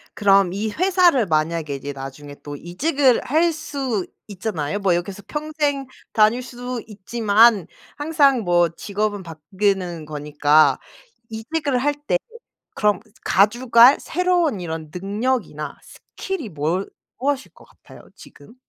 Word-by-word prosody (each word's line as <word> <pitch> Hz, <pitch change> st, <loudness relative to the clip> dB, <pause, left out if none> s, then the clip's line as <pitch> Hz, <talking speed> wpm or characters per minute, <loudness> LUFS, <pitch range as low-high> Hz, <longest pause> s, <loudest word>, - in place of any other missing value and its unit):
그럼 195 Hz, -3 st, +4 dB
이 210 Hz, +3 st, -2 dB
회사를 355 Hz, -, +3 dB
만약에 155 Hz, -2 st, -1 dB
이제 140 Hz, +1 st, -6 dB
나중에 140 Hz, +1 st, -9 dB
또 145 Hz, 0 st, -7 dB
이직을 255 Hz, -, +1 dB
할 325 Hz, +5 st, +2 dB
수 270 Hz, -, -3 dB, 0.2 s
있잖아요. 200 Hz, -4 st, -3 dB
뭐 190 Hz, -3 st, +2 dB
여기서 190 Hz, +3 st, -4 dB
평생 295 Hz, -2 st, -2 dB, 0.3 s
다닐 220 Hz, +3 st, +4 dB
수 245 Hz, -1 st, -6 dB
있지만 215 Hz, -1 st, +3 dB, 0.3 s
항상 290 Hz, -4 st, +3 dB
뭐 175 Hz, -2 st, +3 dB
직업은 205 Hz, +3 st, -3 dB
바뀌는 180 Hz, 0 st, -2 dB
거니까. 150 Hz, 0 st, +2 dB, 0.5 s
이직을 260 Hz, +4 st, -2 dB
할 290 Hz, +3 st, 0 dB
때 -, -, +3 dB, 0.6 s
그럼 210 Hz, -2 st, +2 dB, 0.3 s
가져갈 235 Hz, +5 st, +5 dB
새로운 350 Hz, -, 0 dB
이런 160 Hz, -2 st, -6 dB
능력이나 200 Hz, -, -2 dB, 0.4 s
스킬이 370 Hz, -, -4 dB
무얼 160 Hz, +5 st, -2 dB, 0.3 s
무엇일 275 Hz, 0 st, -2 dB
것 -, -, -18 dB
같아요 -, -, -17 dB
지금? -, -, -16 dB
210 Hz, 260 characters per minute, -21 LUFS, 175-265 Hz, 0.6 s, 가져갈